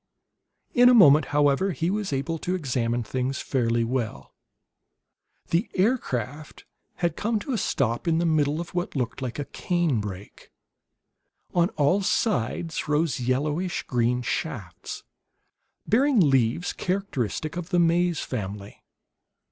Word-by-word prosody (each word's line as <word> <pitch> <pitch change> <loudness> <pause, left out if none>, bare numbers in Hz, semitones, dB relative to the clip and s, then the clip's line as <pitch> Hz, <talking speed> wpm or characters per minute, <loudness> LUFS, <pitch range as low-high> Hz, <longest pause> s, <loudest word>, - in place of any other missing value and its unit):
In 245 0 +7
a 250 - +6
moment, 150 - +7
however, 145 +6 +2
he 165 +5 -1
was 205 -3 -2
able 150 +4 -2
to 180 +4 -2
examine 120 -7 -1
things 130 +4 -2
fairly 115 -3 0
well. 115 - -3 1.2
The 175 +7 +1
aircraft 155 - -1 0.3
had 170 -2 -1
come 225 +1 0
to 235 +6 -4
a - - 0
stop 125 - -1
in 165 -1 +3
the 170 - +1
middle 155 -2 +1
of 170 +2 -6
what 175 -2 -3
looked 125 -1 -2
like 125 -2 -4
a 145 - -3
cane 170 - 0
brake. 100 -1 -9 1.0
On 175 0 +3
all 150 +8 +3
sides 170 - -1
rose 150 -4 +1
yellowish 145 +8 -1
green 125 0 0
shafts, - - -4 0.8
bearing 260 +3 +3
leaves 135 - +2
characteristic 160 - -2
of 175 -1 -5
the 180 - +1
maize 170 0 +2
family. 100 -3 -6
150 Hz, 130 wpm, -25 LUFS, 125-180 Hz, 1.2 s, In